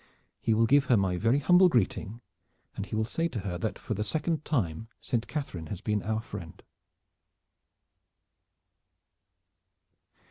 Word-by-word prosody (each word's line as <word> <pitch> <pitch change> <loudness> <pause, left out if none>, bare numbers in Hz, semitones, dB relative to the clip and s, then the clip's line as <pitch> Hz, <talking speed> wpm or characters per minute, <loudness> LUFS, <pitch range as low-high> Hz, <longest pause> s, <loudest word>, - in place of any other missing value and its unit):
"He 115 - +1
will 115 +1 +4
give 140 +4 +4
her 125 -3 +4
my 95 -2 +1
very 115 +8 +2
humble 180 +6 +6
greeting, 115 - 0 0.5
and 100 - -4
he - - -4
will 110 0 +1
say 165 +8 -1
to 120 -10 -4
her 90 -3 -4
that 110 - -2
for - - -4
the 105 +1 -2
second 155 +7 -1
time 110 - -1
Saint 120 -3 -2
Catharine 95 - -4
has 95 - -5
been 105 0 -1
our 110 +4 -1
friend." 85 -7 -9
110 Hz, 145 wpm, -29 LUFS, 100-140 Hz, 0.5 s, humble